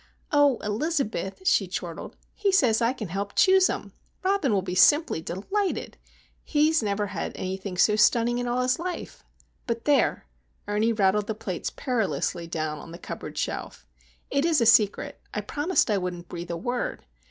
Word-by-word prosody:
"Oh, 290 -4 +4
Elizabeth," 225 - -2
she 200 - +3
chortled, 175 -2 -6 0.2
"he 405 -2 0
says 245 - +3
I 230 +1 +3
can 225 -8 -6
help 200 +3 -4
him - - -35
choose 380 -1 +5
'em! - - -5 0.3
Robin 380 - +1
will 195 -3 +1
be 180 -1 -4
simply 185 - +4
_de_lighted! 370 - -2 0.5
He 300 0 +2
has 320 -3 +2
never 205 -1 -1
had 200 0 -4
anything 190 0 -5
so 210 +3 +4
stunning 235 +3 +3
in 245 - -2
all 245 +1 0
his 250 +2 +1
life! 360 +1 -6 0.4
But 230 -1 -3
there,"—Ernie 225 -6 0
rattled 205 0 +2
the 220 - -2
plates 190 -4 -4
perilously 185 - -2
down 155 -2 -3
on 165 - -11
the 170 - -8
cupboard - - -8
shelf. - - -4 0.5
"It's 300 +2 +2
a 230 - +2
secret. 215 -2 +3
I 210 - -1
promised 290 - 0
I 205 - +2
wouldn't 180 -1 -5
breathe 175 0 -7
a 170 - -3
word! 245 +7 -3
220 Hz, 170 wpm, -26 LUFS, 190-285 Hz, 0.5 s, choose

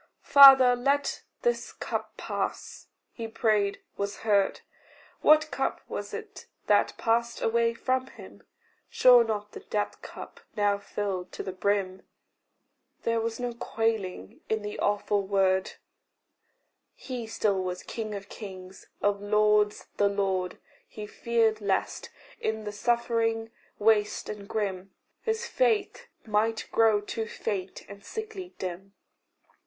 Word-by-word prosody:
"Father, 270 -3 +9
let 275 +3 0 0.2
this 480 0 0
cup - - -5
pass." - - -4 0.2
He 230 -2 -6
prayed 215 -3 +1 0.2
was 200 0 -4
heard. 200 -3 +2 0.6
What 310 +1 +5
cup - - -1
was - - -5
it 440 -2 -8 0.2
that - - +2
passed 235 0 0
away 230 0 +1
from 255 +2 -1
him? - - -13 0.5
Sure 245 -2 +7
not 210 -2 -3
the - - -8
death 210 -1 -3
cup, - - -10 0.2
now 205 -1 +2
filled 200 -3 -4
to - - -5
the 190 - -4
brim! 190 0 -1 1.0
There 230 0 +1
was 225 +1 -3
no 245 -1 -2
quailing 225 - -3
in 220 -1 0
the 210 0 -5
awful 205 0 +1
word; 190 -1 +1 1.2
He 245 -4 -6
still 205 -3 0
was 180 0 -4
king 215 -2 -5
of 200 0 -7
kings, 190 -3 -10 0.2
of 205 0 +1
lords 210 0 +2
the 200 0 +3
lord: 190 -2 -1 0.3
He 210 - -8
feared 225 0 0
lest, 200 -2 -1 0.3
in 220 0 -2
the 210 - -4
suffering 225 0 0 0.3
waste 210 -1 +2
and 205 -1 -7
grim, 195 -3 -3 0.3
His 445 +1 -1
faith 450 -4 0 0.2
might 220 +1 0
grow 220 -2 +4
too 220 +1 -4
faint 195 -3 -5
and 200 0 -12
sickly 415 - -7
dim. 190 +1 -6
215 Hz, 130 wpm, -28 LUFS, 200-235 Hz, 1.2 s, Father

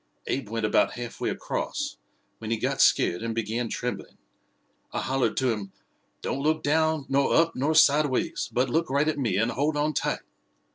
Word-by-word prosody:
Abe 135 -5 -2
went 115 -1 -1
about 105 - +2
half 120 -1 -7
way - - 0
across, - - -3 0.4
when 110 - -6
he 115 - +1
got - - 0
scared 85 - +3
and 115 -1 -3
began 115 +1 -2
trembling. 125 +2 -5 0.7
I - - -2
hollered 130 -4 0
to 130 -2 +2
him, 100 -3 -5 0.5
'Don't 135 - -2
look 155 +2 +1
down 160 0 +1
nor 140 0 +2
up 165 0 +4
nor 145 +5 0
sideways, 150 -3 +3
but 125 +2 +1
look 165 +5 0
right 140 +3 +2
at 155 -2 0
me 115 -8 0
and 115 +4 +1
hold 150 +3 0
on 150 +1 +1
tight!' - - -1
130 Hz, 185 wpm, -26 LUFS, 115-150 Hz, 0.7 s, up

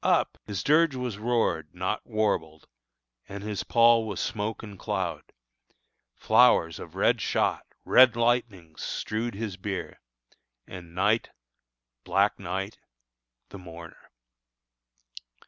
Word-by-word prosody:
up! - - +1
His 100 -2 -4
dirge 155 -1 +3
was 125 -5 -4
roared 110 -9 -1
Not 95 +4 -3
warbled, 100 -9 -1 0.6
and 100 0 -7
his 105 -1 -3
pall 115 -1 +4
was 100 -4 -4
smoke 105 +2 -3
and 100 -4 -10
cloud; - - -3 0.8
Flowers 110 -8 +4
of - - -10
red - - +2
shot, - - 0 0.2
red 125 -3 +6
lightnings 115 -9 -1
strewed 110 0 -3
his 100 -3 -5
bier, 95 0 -5 0.7
And 85 -2 -11
night, 105 +5 +1 0.7
black - - +1
night, 95 +4 -5 0.7
the 100 - -10
mourner. 85 -2 -12
105 Hz, 110 wpm, -27 LUFS, 90-115 Hz, 0.8 s, red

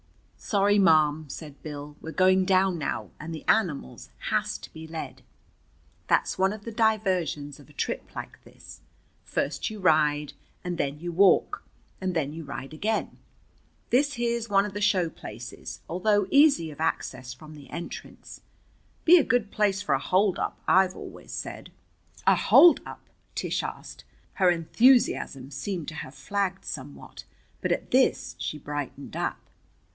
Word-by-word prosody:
"Sorry, 205 0 +2
ma'am," 155 -4 +4
said 145 +1 -9
Bill. 145 -1 -7
"We're 160 - -6
going 185 +2 +4
down 185 -2 +3
now, 150 - -3
and 165 +2 -6
the 155 - -8
animals 160 - 0 0.2
has - - 0
to - - -13
be 160 0 -9
led. 140 -5 -7 0.9
That's - - +1
one 190 +1 +3
of 210 -1 -8
the 230 - -5
diversions 190 - 0
of 145 - -16
a - - -17
trip - - -4
like - - -8
this. - - -14 0.4
First - - -2
you 215 -1 -8
ride 150 -4 +2 0.3
and 175 -1 -4
than 140 +1 -1
you 175 +2 -4
walk. 190 +3 +3 0.4
And 185 -1 -2
then 150 -3 -1
you 165 +1 -7
ride 140 0 -7
again. 215 +8 -2 0.7
This 280 +3 +3
here's 235 -1 -1
one 200 0 +4
of 205 - -6
the 205 - -4
show 195 -4 +3
places, 120 -6 -9
although 205 +3 +2
easy 280 - +5
of 150 - -10
access 130 -5 -2
from 155 +3 -13
the 145 -2 -13
entrance. 170 +2 -8 0.6
Be 350 +2 +8
a - - +3
good 245 -6 +1
place 205 -3 +1
for - - +1
a 135 - +2
holdup, 185 +5 +1
I've 185 0 +4
always - - -10
said." - - -6 0.5
"A - - +6
holdup?" 345 -1 +5 0.3
Tish - - -1
asked. - - -8 0.3
Her 185 -2 +3
enthusiasm 170 - +3
seemed 165 +4 -4
to 155 - -9
have 135 -3 -7
flagged 190 +7 -2
somewhat, 140 0 -8 0.4
but - - -1
at - - -2
this - - +2
she 155 - -3
brightened 145 -1 -6
up. - - -2
175 Hz, 155 wpm, -27 LUFS, 150-205 Hz, 0.9 s, Be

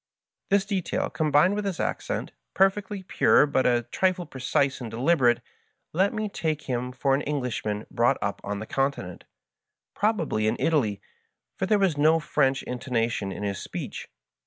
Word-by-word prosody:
This 195 0 +3
detail, 195 -4 -2
combined 155 +4 +3
with 210 0 -2
his 195 -4 -3
accent, - - -2 0.2
perfectly 195 0 +1
pure 180 - +4
but 135 -2 +1
a 120 -1 +2
trifle 185 -1 +1
precise 135 0 0
and 120 - -5
deliberate, 125 +1 +2 0.5
led 190 +5 +3
me 215 -1 -2
to 200 - -12
take 155 -2 -2
him 125 -1 -2
for 135 +2 0
an 135 - +2
Englishman 125 -7 -2
brought 120 +3 +2
up 100 0 -3
on 100 +1 -3
the 110 - -5
Continent 135 -9 -2 0.4
— - - -62
^probably 165 - +1
in 110 - +1
Italy, 110 -11 +1 0.5
for 190 - -2
there 210 - +4
was 185 -7 +1
no 160 +2 +5
French 135 -3 +1
intonation 120 -5 -2
in 105 - -6
his 100 -2 -2
speech. - - -6
140 Hz, 165 wpm, -26 LUFS, 120-185 Hz, 0.5 s, no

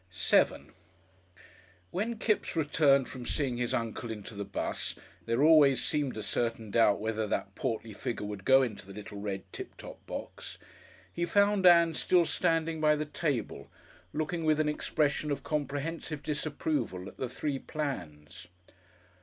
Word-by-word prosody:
§7 - - +2 1.2
When 225 +5 -2
Kipps 215 -4 0
returned 145 -3 +3
from 125 - -8
seeing 130 -1 -1
his 120 -1 -1
uncle 115 +1 -2
into 110 0 -6
the 100 0 -4
'bus 100 - -3 0.3
there 115 +4 +2
always 150 -4 +6
seemed 145 -6 -1
a 110 - -4
certain 115 -1 -2
doubt 110 -3 +4
whether 110 0 -1
that 100 -1 -2
portly 115 -5 -3
figure 105 +1 -4
would 105 -1 -6
go 135 0 +6
into 105 -6 -5
the 100 - -9
little 105 -1 -8
red 100 -2 -4
"Tip - - -8
Top" - - -11
box - - -7 0.6
he 170 - -2
found 200 +1 +4
Ann 170 -1 +7
still 175 +2 +3
standing 160 +1 0
by 150 0 +5
the 150 0 -2
table, 145 -4 -3 0.4
looking 155 +3 -2
with 155 -1 +3
an 155 -1 +2
expression 150 0 0
of 140 -2 -2
comprehensive 150 +1 -3
disapproval 145 - -2
at - - -11
the 130 - -3
three 135 +2 -3
plans. 90 - -6
140 Hz, 155 wpm, -30 LUFS, 110-155 Hz, 1.2 s, Ann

